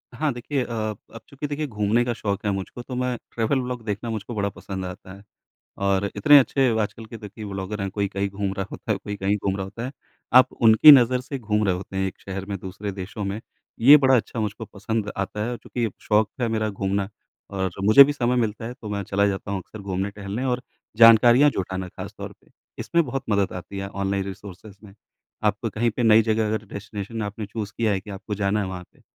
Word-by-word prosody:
हाँ, 155 -1 0
देखिए 125 +3 -2
अ, 120 - -8 0.4
अब 115 - -8
चूँकि 140 +1 -5
देखिए 150 +1 -3
घूमने 105 0 +1
का 120 - -1
शौक 100 -2 -3
है 105 - +2
मुझको 95 +5 -5
तो 125 +1 -7
मैं 125 -1 -1
ट्रैवल 115 +4 0
व्लॉग 125 -1 -5
देखना 105 +2 -3
मुझको 110 +1 -5
बड़ा 100 -1 0
पसंद 95 -1 -7
आता 90 +1 -9
है, 100 +1 -14 0.5
और 100 0 +1
इतने 145 -1 +8
अच्छे 135 0 +2
आजकल 110 +2 -3
के 115 - -9
देखिए 105 0 -9
व्लॉगर 100 +1 -5
है, 95 - -1
कोई 100 0 -1
कहीं 100 0 -2
घूम 100 0 -3
रहा 95 -1 -3
होता 115 - -3
है, 100 - -2
कोई 105 0 -6
कहीं 100 +1 0
घूम 95 -1 -2
रहा 95 - -3
होता 105 +5 -7
है। 130 - -7 0.5
आप 130 0 +4
उनकी 115 +6 +7
नज़र 125 -2 +5
से 135 +2 -6
घूम 105 -2 0
रहे 95 -3 +2
होते 95 +1 -7
हैं 95 0 +1
एक - - -11
शहर 95 0 -6
में, 100 -1 -3
दूसरे 100 +2 -6
देशों 100 +2 -6
में। 100 +2 -3 0.4
ये 140 +6 +9
बड़ा 130 -2 +4
अच्छा 115 0 -2
मुझको 110 +1 -3
पसंद 105 +1 -3
आता 100 +2 -3
है, 120 - -3
चूँकि 120 -1 -3
शौक 105 0 +2
है 120 - +1
मेरा 110 -1 0
घूमना 100 0 -2 0.4
और 95 -1 -2
मुझे 110 +7 +9
भी 145 - 0
समय 125 -3 0
मिलता 115 -2 -1
है 120 - -6
तो 110 - -10
मैं 100 -1 -2
चला 100 +1 +1
जाता 100 -1 -3
हूँ 100 - -1
अक्सर 110 - -12
घूमने 95 0 -3
टहलने 100 +4 -5
और 125 -1 -1 0.3
जानकारियाँ 120 +5 +7
जुटाना 95 -4 -4
ख़ास - - -8
तौर - - -6
पे। - - -28 0.3
इसमें 170 -1 +1
बहुत 135 0 -3
मदद 100 -2 +1
आती 95 +2 -7
है 100 0 -4
ऑनलाइन 100 0 -2
रिसोर्सेज़ 100 +1 -10
में। 100 -2 -14 0.5
आपको 105 +2 0
कहीं 115 +3 0
पे 115 - -3
नई 110 -1 +6
जगह 110 0 +1
अगर 110 0 -2
डेस्टिनेशन 100 +2 -6
आपने 105 +1 -5
चूज़ 105 0 -5
किया 110 -2 +1
है 95 - -1
कि 105 - -12
आपको 100 +2 -5
जाना 100 +1 0
है 100 - -2
वहाँ 90 -1 -6
पे, - - -26
105 Hz, 230 wpm, -24 LUFS, 100-120 Hz, 0.5 s, ये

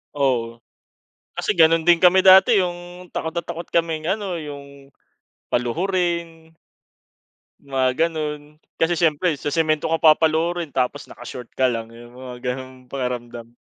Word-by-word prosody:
Oo, 120 -4 -1 0.7
kasi - - -2
ganun 165 0 +4
din 175 -1 +7
kami 185 +1 +6
dati, 190 +3 +7
yung 175 0 -6
takot 160 - -4
na 170 - -3
takot 170 0 -7
kaming, 165 -2 0
ano 195 -3 -2
yung, 140 -2 -10 0.6
paluhurin 170 +4 -2 1.2
mga 135 -2 +1 0.2
ganun, 150 -2 -6 0.2
kasi 165 +1 +2
syempre 165 0 +1
sa 145 +1 -4
semento 155 0 0
ka 165 - +1
papaluhirin, 160 +1 +2
tapos 135 +1 -2
naka-short 125 -2 -9
ka 130 - +3
lang, 115 -2 -2
yung 120 +1 -14
mga 125 0 -5
gano'ng 130 0 -10
pakiramdam. 120 -3 -5
155 Hz, 130 wpm, -21 LUFS, 130-170 Hz, 1.2 s, din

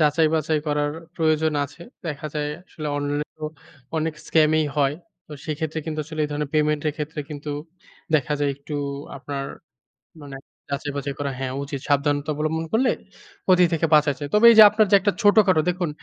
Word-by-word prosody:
যাচাই-বাচাই 155 0 +2
করার 145 0 0 0.3
প্রয়োজন 160 -1 +2
আছে। 140 +5 -12 0.2
দেখা 150 -1 -4
যায় 150 0 -1 0.2
আসলে 155 -2 -7
অনলাইনে 145 +1 -2
তো 155 - -6 0.5
অনেক 160 0 -1
স্কামই 155 -1 +3
হয়। 140 -1 +2 0.3
তো - - -11
সেক্ষেত্রে 160 0 -3
কিন্তু 155 -1 -4
আসলে 155 +1 -6
এই - - -3
ধরনের 145 -1 -3
পেমেন্টের 150 0 +1
ক্ষেত্রে 150 +1 -4
কিন্তু 150 0 -6 0.6
দেখা 150 -1 +2
যায় 145 -1 +1
একটু 145 +2 -8 0.4
আপনার, 140 0 -5 0.8
মানে 140 -2 -8 0.3
যাচাই-বাচাই 140 0 -3
করা, 140 -1 -2
হ্যাঁ, 130 -1 -3
উচিত। 140 0 -5
সাবধানতা 145 +1 +1
অবলম্বন 155 +2 -2
করলে 250 +3 +3 0.5
ক্ষতি 180 -1 +5
থেকে 165 0 +1
বাঁচা 150 -1 +5
যায়। 145 0 -5
তবে 210 +2 +5
এই - - +5
যে 220 - +12
আপনার 215 +1 +3
যে - - +8
একটা 205 +1 +1
ছোটখাটো 205 -5 +5
দেখুন, 180 -2 -1
150 Hz, 170 wpm, -23 LUFS, 145-160 Hz, 0.8 s, যে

